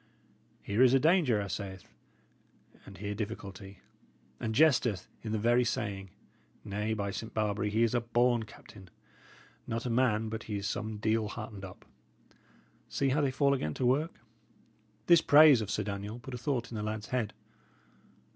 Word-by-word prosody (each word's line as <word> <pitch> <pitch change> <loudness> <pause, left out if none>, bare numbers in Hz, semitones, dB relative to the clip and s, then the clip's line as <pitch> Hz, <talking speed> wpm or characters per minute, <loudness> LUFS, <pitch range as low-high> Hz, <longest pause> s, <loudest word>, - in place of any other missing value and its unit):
Here 105 +4 0
is 130 0 +6
a - - +5
danger, 155 - +3
'a 100 - -3
saith, 95 -2 -6 1.0
and 100 - -11
here 100 +2 -4
difficulty; 100 -2 -7 0.6
and 110 -1 -3
jesteth 125 - +3
in 110 - -5
the 110 - 0
very 120 +3 +3
saying. 100 -4 -3 0.6
Nay, 105 +2 -2
by 100 -2 -2
Saint 110 +3 -7
Barbary, 105 -1 0
he 110 +3 +2
is 115 - +1
a 120 - +2
born 120 +1 +2
captain! 95 -4 -15 0.8
Not 115 +1 -3
a 120 - -1
man 115 -3 +2
but 110 0 -5
he 105 - -4
is 100 - -5
some 110 +1 -3
deal 110 +1 0
heartened 105 -2 -7
up! 95 -1 -10 1.0
See 140 - 0
how 145 +3 +2
they 140 - +2
fall 140 +1 +2
again 75 - -2
to 130 - -1
work." 145 +7 +1 0.9
This 170 +2 +6
praise 145 -5 +7
of 105 - -4
Sir 105 - -1
Daniel 100 +2 -5
put 125 +2 -10
a - - -3
thought 120 -2 -2
in 115 - -5
the - - -3
lad's 110 0 -4
head. 120 -4 -2
110 Hz, 175 wpm, -31 LUFS, 105-125 Hz, 1.0 s, praise